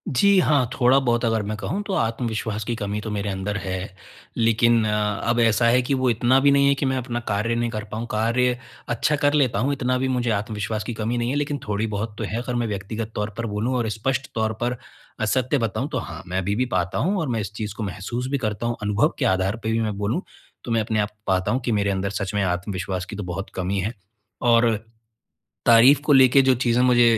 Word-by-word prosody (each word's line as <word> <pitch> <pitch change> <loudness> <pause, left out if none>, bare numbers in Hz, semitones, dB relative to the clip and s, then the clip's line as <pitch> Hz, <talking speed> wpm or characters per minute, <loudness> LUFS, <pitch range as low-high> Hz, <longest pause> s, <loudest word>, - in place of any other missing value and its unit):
जी 200 +8 +5
हाँ, 145 -8 +3
थोड़ा-बहुत 125 -2 +3
अगर 115 -1 +1
मैं 105 +1 -3
कहूँ 190 - -3
तो 195 - -2
आत्मविश्वास 110 -2 -1
की 120 - -2
कमी 105 -1 -3
तो 110 - -5
मेरे 100 0 -2
अंदर 100 +2 -3
है, 95 -1 -4 0.5
लेकिन 115 0 +3
अ, 105 -1 0
अब 120 0 +2
ऐसा 115 0 +3
है 125 +2 +4
कि 130 +3 -1
वो 130 -1 +2
इतना 120 +3 +3
भी 140 +1 +4
नहीं 140 0 +4
है 140 - +4
कि 140 - -2
मैं 130 0 +1
अपना 120 -1 -3
कार्य 105 +3 0
नहीं 120 0 0
कर 110 -2 -4
पाऊँ, 110 +2 -3
कार्य 120 +3 +1 0.3
अच्छा 120 +5 +1
कर 145 0 +2
लेता 140 -5 +2
हूँ 140 +3 +1
इतना 130 -1 0
भी 130 +1 0
मुझे 125 -2 0
आत्मविश्वास 105 0 -2
की 120 - -4
कमी 115 +2 -2
नहीं 120 0 -1
है 135 - -1
लेकिन 145 0 -1
थोड़ी-बहुत 105 +1 -2
तो 110 - -4
है 110 +3 -3
अगर 125 0 -4
मैं 120 -1 0
व्यक्तिगत 105 +2 -4
तौर 105 0 -2
पर 115 - -2
बोलूँ 110 +4 -1
और 115 -2 -1
स्पष्ट 135 +5 -2
तौर 110 -1 0
पर 125 0 -1 0.4
असत्य 130 +5 +1
बताऊँ 115 -5 -2
तो - - -1
हाँ, - - -6
मैं 90 +1 -3
अभी 100 +2 0
भी 125 - +1
पाता 90 +1 -1
हूँ 190 +7 +1
और 160 - -1
मैं 115 -2 0
इस 105 - -6
चीज़ 105 -2 -4
को 110 - -4
महसूस 105 +5 -4
भी 140 - +1
करता 110 -2 -3
हूँ, 120 0 0
अनुभव 105 +1 +2
के - - +1
आधार 95 +2 +1
पर 110 - -1
भी 115 - +1
मैं 105 -2 -2
बोलूँ 105 - -1 0.4
तो 120 - -5
मैं 115 -1 +2
अपने 110 0 -1
आप 105 - 0 0.2
पाता 95 -1 +1
हूँ 125 - +1
कि 120 - 0
मेरे 100 -2 +1
अंदर 100 0 -1
सच 100 -1 -3
में 105 -1 +1
आत्मविश्वास 90 0 -2
की 105 - -8
तो 105 - -5
बहुत 90 +2 -5
कमी 95 +2 -1
है 105 +6 -2 0.6
और 115 -1 +4 0.9
तारीफ़ 120 +4 +7
को 145 - +4
लेके 135 0 +7
जो 130 0 +4
चीज़ें 120 0 +2
मुझे 125 -1 +5
115 Hz, 240 wpm, -23 LUFS, 105-125 Hz, 0.9 s, तारीफ़